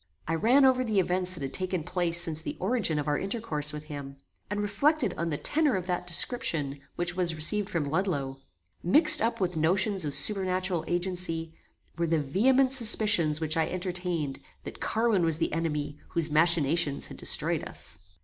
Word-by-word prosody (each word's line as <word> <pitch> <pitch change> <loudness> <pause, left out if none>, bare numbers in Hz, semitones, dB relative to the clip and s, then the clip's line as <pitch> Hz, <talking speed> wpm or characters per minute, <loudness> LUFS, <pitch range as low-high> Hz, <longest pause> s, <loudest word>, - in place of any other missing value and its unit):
I 160 - -2
ran 240 - +3
over 255 -1 +2
the 215 -5 0
events 185 0 +1
that 150 - -8
had 135 - -6
taken 185 -3 -3
place 170 0 -1
since 160 -2 +5
the - - -6
origin 195 -6 -1
of 150 - -3
our 145 0 0
intercourse 195 -8 -3
with 150 0 -8
him, 140 -2 -9 0.3
and 205 0 -3
reflected 225 - 0
on 170 +1 -3
the 150 - -3
tenor 295 - +1
of 185 -2 -4
that 180 -1 -4
description 165 - 0 0.2
which 175 0 -4
was 175 -3 0
received 200 +6 +3
from 165 -3 -2
Ludloe. 140 -5 -3 0.4
Mixed 240 - +7
up 230 +2 -1
with 180 -2 -2
notions 185 +4 +1
of 145 -2 0
supernatural 185 -4 0
agency, 175 -2 -3 0.5
were 170 - 0
the 165 0 +1
vehement 255 - +1
suspicions 215 - +4
which 160 -1 -2
I 160 -1 0
entertained, 180 -6 -4 0.2
that - - -10
Carwin 225 -5 0
was 165 -2 +1
the 165 - -2
enemy 150 -2 -3
whose 165 -2 -1
machinations 155 -2 +1
had - - -10
destroyed - - -1
us. - - -1
175 Hz, 180 wpm, -27 LUFS, 155-200 Hz, 0.5 s, Mixed